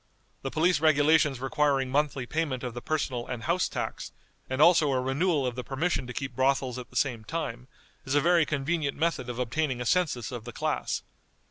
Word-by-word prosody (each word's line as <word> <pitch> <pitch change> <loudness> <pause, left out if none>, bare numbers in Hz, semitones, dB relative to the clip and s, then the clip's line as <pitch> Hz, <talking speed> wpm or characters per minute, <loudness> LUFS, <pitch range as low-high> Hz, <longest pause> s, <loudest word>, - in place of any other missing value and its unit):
The 135 - -3
police 160 +2 +2
regulations 150 -2 +4
requiring 135 0 +1
monthly 140 -2 0
payment 145 -3 -2
of 125 -2 -4
the 120 - -6
personal 135 -6 -2
and 125 -3 -5
house 170 +2 +1
tax, - - -4 0.4
and 130 +1 -2
also 155 -2 +6
a 130 - +1
renewal 140 +3 +1
of 125 - -1
the 125 +1 -5
permission 135 -1 -1
to 125 - -6
keep 135 +2 -4
brothels 130 -1 +1
at 125 - -9
the - - -19
same 125 -3 0
time, 130 -4 -4 0.4
is 135 0 -2
a - - +6
very 170 +2 +4
convenient 150 0 -1
method 160 -5 0
of 120 - -5
obtaining 125 +2 -1
a 125 - -3
census 135 -6 +1
of 120 -3 -6
the 120 +1 -8
class. - - -2
135 Hz, 200 wpm, -28 LUFS, 125-155 Hz, 0.4 s, also